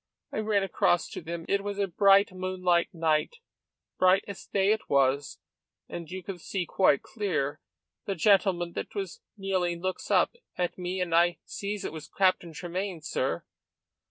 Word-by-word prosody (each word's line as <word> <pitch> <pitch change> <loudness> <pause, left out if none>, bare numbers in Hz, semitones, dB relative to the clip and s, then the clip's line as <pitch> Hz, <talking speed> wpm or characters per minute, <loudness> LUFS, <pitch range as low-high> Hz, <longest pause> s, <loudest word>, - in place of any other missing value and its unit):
I - - -2
ran 210 -2 +2
across 175 -2 +2
to - - -6
them. 165 0 -5
It 200 0 +1
was 205 0 -4
a 200 - +2
bright, 195 +2 +5
moonlight 185 -2 +1
night 160 - +1 0.6
bright 185 +1 +5
as 200 -2 -8
day 195 0 +2
it 220 - -1
was, 140 0 +2 0.5
and 170 -2 -7
you 185 0 -6
could 185 -2 -7
see 185 0 -2
quite 175 -6 +3
clear. 180 -10 -2 0.4
The 195 - -2
gentleman 180 -2 +3
that - - -5
was 195 -3 -4 0.2
kneeling 185 -3 -1
looks 185 +1 -3
up, - - +3 0.2
at 180 -1 -1
me, 180 +1 -3
and 175 -2 -1
I 175 +1 +4
sees 205 0 -4
it - - -4
was 155 -2 -8
Captain 185 -3 +1
Tremayne, 180 +2 -4
sir. - - -1
185 Hz, 165 wpm, -28 LUFS, 170-195 Hz, 0.6 s, bright